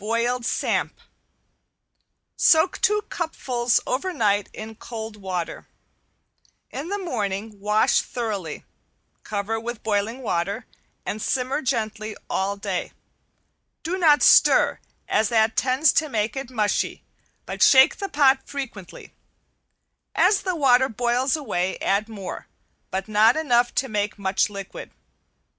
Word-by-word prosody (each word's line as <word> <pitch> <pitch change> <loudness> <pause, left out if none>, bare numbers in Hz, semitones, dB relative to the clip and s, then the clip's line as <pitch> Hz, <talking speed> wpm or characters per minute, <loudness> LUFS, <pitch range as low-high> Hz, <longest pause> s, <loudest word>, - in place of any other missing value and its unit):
~BOILED 235 +2 0
SAMP~ - - -1 1.4
Soak 320 +3 +4
two 420 0 +2
cupfuls 250 -8 0
over 280 +9 -2
night 205 - +1
in 220 +1 -8
cold 220 -1 -8
water. 185 -4 -5 1.0
In 285 +4 -5
the 405 - -1
morning 215 - -4
wash 210 +2 +2
thoroughly, 205 -10 -5 0.6
cover 215 +2 -3
with 235 0 -6
boiling 220 +4 -1
water, 200 +3 -2 0.4
and 215 - -4
simmer 260 +5 -1
gently 220 -4 -3
all 195 +1 -1
day. 200 -3 -4 0.9
Do 345 +3 -2
not 315 -6 +4
stir, - - +5 0.3
as 215 0 +1
that 220 -1 +2
tends 260 +3 +3
to 310 -1 +1
make 215 -3 -1
it 270 -2 -5
mushy, 215 -5 -1 0.4
but - - -6
shake 265 -1 +7
the 395 - -4
pot 280 -3 +4
frequently. 245 -10 -8 1.0
As 410 - +4
the 370 -2 -2
water 265 -3 +4
boils 245 +4 0
away 190 - -2
add 205 +3 0
more, 200 -4 -7 0.4
but 190 +1 -3
not 215 +4 +4
enough 245 -6 +2
to 270 - 0
make 210 -2 -2
much 195 +1 0
liquid. 200 -1 -8
225 Hz, 125 wpm, -23 LUFS, 205-265 Hz, 1.4 s, shake